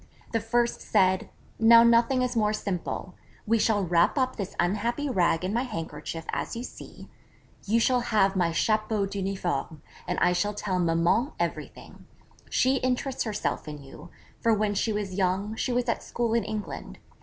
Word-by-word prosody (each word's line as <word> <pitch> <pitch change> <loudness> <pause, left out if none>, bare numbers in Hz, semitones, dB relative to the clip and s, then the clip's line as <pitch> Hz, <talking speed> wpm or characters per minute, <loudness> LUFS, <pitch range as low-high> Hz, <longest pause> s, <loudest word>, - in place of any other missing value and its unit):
The 225 - +1
first 235 +2 0
said: 190 -3 +2 0.3
'Now 230 +1 +8
nothing 235 +2 +4
is 250 -1 -2
more 215 -2 +2
simple: 185 -2 -4 0.3
we 230 +1 +2
shall 210 -2 +2
wrap 175 - +2
up 255 -1 +1
this 200 -3 -5
unhappy 230 +10 0
rag 175 -4 +2
in 190 - -2
my 235 - +1
handkerchief 165 -7 -5
as - - -3
you 235 - -4
see;_ - - -11 0.6
You 225 +3 +3
shall 250 +2 +3
have 210 -5 +2
my 175 -3 +2
chapeau 215 +5 +1
d'uniforme_, 190 -6 -3 0.3
and 180 - -1
I 180 - +3
shall 205 +4 -1
tell 190 -3 -2
Maman 175 - +2
everything - - -5 0.4
she 260 +1 +2
interests 255 +1 -1
herself 210 -6 -3
in 150 -2 -7
you; 135 - -12 0.3
for 230 -1 +3
when 210 0 0
she 220 +2 0
was 205 -3 -3
young, 190 +3 0
she 250 - -2
was 245 0 +1
at 235 - 0
school 235 -2 -2
in 230 -3 +1
England. 205 - -6
210 Hz, 170 wpm, -27 LUFS, 185-235 Hz, 0.6 s, Now